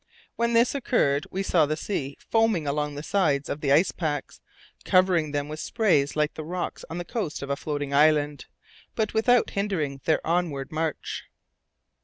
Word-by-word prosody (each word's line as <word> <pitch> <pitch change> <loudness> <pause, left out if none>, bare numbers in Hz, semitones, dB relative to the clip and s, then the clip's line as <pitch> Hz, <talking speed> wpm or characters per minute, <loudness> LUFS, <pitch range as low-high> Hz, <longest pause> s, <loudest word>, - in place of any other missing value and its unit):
When 235 0 0
this 235 +2 +4
occurred 155 - +1
we 195 +1 -2
saw 165 -5 +3
the 155 +1 -1
sea 140 -7 -4
foaming 225 -8 +2
along 145 +1 -1
the 145 - -6
sides 150 -7 +1
of 145 - -4
the 140 - +1
ice 160 +7 +4
packs, 150 -4 -4 0.4
covering 180 -5 +3
them 145 0 -2
with 155 +1 -6
spray 195 - +2
like 150 0 +1
the 155 - -6
rocks 175 +3 -4
on 165 - -5
the 175 - -4
coast 195 - -3
of 140 - -4
a - - +1
floating 145 -1 -4
island, 150 0 +3 0.5
but 220 -2 -1
without 235 +2 +3
hindering 160 -9 -2
their 160 - +1
onward 165 -6 -1
march. 160 -1 -3
155 Hz, 175 wpm, -26 LUFS, 145-195 Hz, 0.5 s, this